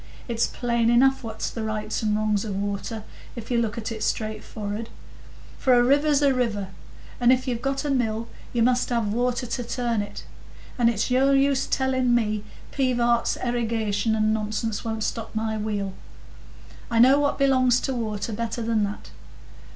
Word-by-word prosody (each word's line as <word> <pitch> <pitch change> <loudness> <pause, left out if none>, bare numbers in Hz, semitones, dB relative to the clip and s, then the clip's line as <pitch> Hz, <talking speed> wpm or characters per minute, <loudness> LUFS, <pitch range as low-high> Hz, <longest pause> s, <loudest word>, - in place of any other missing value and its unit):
It's 235 -2 +1
plain 235 -1 0
enough 265 +3 +4
what's 220 -1 -4
the 230 - -5
rights 215 0 -2
and 210 -1 +1
the - - -1
wrongs 215 -2 +1
of 205 -3 -4
water, 205 +2 -3 0.3
if 235 0 -8
you 240 - +3
look 225 0 -2
at 230 0 -4
it 220 -1 -5
straight 215 -1 -2
forrard; 215 +2 -5 0.7
for 255 -2 +4
a 240 - +5
river's 285 +2 +3
a 275 -1 +4
river, 215 -6 -1 0.5
and 245 0 +5
if 255 +1 +2
you've 240 -2 -2
got 275 +2 -1
a 290 - 0
mill, 230 -3 0 0.2
you 235 -2 +1
must 250 +1 +2
have 230 -4 0
water 245 +1 0
to 245 +1 -3
turn 235 -2 -1
it; 205 - -7 0.5
and 235 -2 +3
it's 230 +2 -1
no 270 +2 +4
use 275 0 +2
telling 260 -2 +1
me 215 -3 0 0.3
Pivart's 240 -3 +1
erigation 225 -3 0
and 215 0 +2
nonsense 215 0 -2
won't 220 -1 -3
stop 225 0 -4
my 220 0 -1
wheel; 205 -2 -2 1.0
I 230 - 0
know 260 +4 +7
what 285 -1 +1
belongs 255 -3 +4
to 265 - -2
water 220 -2 -3
better 230 +1 -3
than 225 -2 +1
that. 200 +1 -7
230 Hz, 180 wpm, -25 LUFS, 215-250 Hz, 1.0 s, know